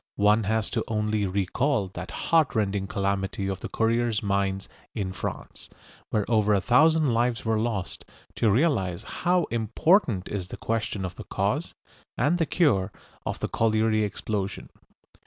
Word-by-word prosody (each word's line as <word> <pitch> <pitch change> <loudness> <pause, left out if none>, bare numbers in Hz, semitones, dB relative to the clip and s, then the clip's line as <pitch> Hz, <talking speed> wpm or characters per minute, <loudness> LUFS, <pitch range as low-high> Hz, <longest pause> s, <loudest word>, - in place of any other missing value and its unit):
One 105 +1 +4
has 110 +1 0 0.2
only 105 0 0
to - - -2
recall 100 +4 0
that 90 -1 -7
heart 160 -6 +1
rending 100 -2 0
calamity 100 -1 -1
of 95 -1 -3
the - - -6
Courrières 115 -1 +1
mines 100 -1 0 0.3
in 100 -4 -2
France, 95 - -6 0.4
where 105 -2 0
over 105 -2 +3
a - - +3
thousand 150 +5 +4
lives 120 -1 0
were 110 -1 +1
lost, 110 -5 -3 0.3
to 115 - +3
realise 100 - +1
how 180 0 0
important 115 - +2
is 95 -3 -4
the - - -8
question 110 -3 -2
of 90 - -7
the - - -7
cause - - -1 0.4
and 170 +4 +2
the 165 - +1
cure 110 - +2 0.4
of - - -2
the - - 0
colliery 110 -1 +2
explosion. 100 -1 -3
110 Hz, 155 wpm, -26 LUFS, 100-120 Hz, 0.4 s, One